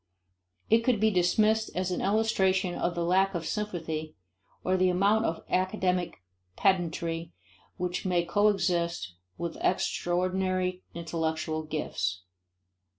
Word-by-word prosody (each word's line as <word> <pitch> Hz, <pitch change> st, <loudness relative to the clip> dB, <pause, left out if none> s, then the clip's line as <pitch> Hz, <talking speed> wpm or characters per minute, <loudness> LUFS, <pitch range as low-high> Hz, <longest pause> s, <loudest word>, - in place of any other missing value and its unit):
It 225 Hz, -, +5 dB
could 230 Hz, -1 st, +1 dB
be 220 Hz, +1 st, +3 dB
dismissed 215 Hz, +4 st, +3 dB
as 185 Hz, 0 st, -1 dB
an 180 Hz, -, -1 dB
illustration 190 Hz, -3 st, +2 dB
of 175 Hz, -, -1 dB
the 170 Hz, -, -1 dB
lack 190 Hz, +3 st, +2 dB
of 165 Hz, -1 st, -3 dB
sympathy 160 Hz, -7 st, -3 dB, 0.5 s
or 185 Hz, -, +2 dB
the 185 Hz, 0 st, +3 dB
amount 200 Hz, +5 st, +3 dB
of 165 Hz, -, -2 dB
academic 185 Hz, -, 0 dB, 0.3 s
pedantry 170 Hz, -3 st, 0 dB, 0.4 s
which 180 Hz, -1 st, -2 dB
may 175 Hz, -2 st, +1 dB
coexist 175 Hz, -, +1 dB, 0.2 s
with 170 Hz, -1 st, -4 dB
extraordinary 185 Hz, +1 st, 0 dB
intellectual 160 Hz, -1 st, -2 dB
gifts. 95 Hz, -13 st, -3 dB
180 Hz, 115 wpm, -29 LUFS, 170-195 Hz, 0.5 s, It